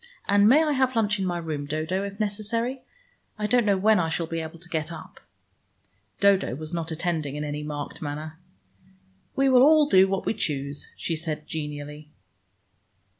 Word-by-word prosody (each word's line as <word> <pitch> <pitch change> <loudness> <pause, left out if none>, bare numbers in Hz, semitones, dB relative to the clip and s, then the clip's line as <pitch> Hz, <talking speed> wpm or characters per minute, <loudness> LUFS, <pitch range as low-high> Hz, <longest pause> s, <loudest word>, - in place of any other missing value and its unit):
And 200 +1 +5
may 300 +6 +6
I 305 - +1
have 260 -2 +1
lunch 210 -2 +1
in 190 - -1
my 175 -1 -1
room, 155 -4 -4
Dodo, 160 +6 -2
if 200 0 -7
necessary? 225 +5 -1 0.6
I 210 - -2
don't 240 0 +2
know 200 -1 +3
when 215 +2 +4
I 165 -2 0
shall 165 +1 -1
be 165 0 -4
able 160 +1 -7
to 170 +1 -14
get 160 -1 -3
up." - - -10 1.0
Dodo 200 -9 +3
was 155 +3 -7
not 165 -1 -3
attending 160 -3 -2
in 150 - -3
any 150 0 -4
marked 150 -1 -6
manner. 155 +1 -6 1.0
"We 270 0 +3
will 255 -2 +6
all 300 +1 +6
do 190 -5 +6
what 195 0 -2
we - - +1
choose," 140 -8 -2
she 165 - -2
said 155 -1 -4
genially. 150 -1 -6
170 Hz, 180 wpm, -25 LUFS, 155-210 Hz, 1.0 s, may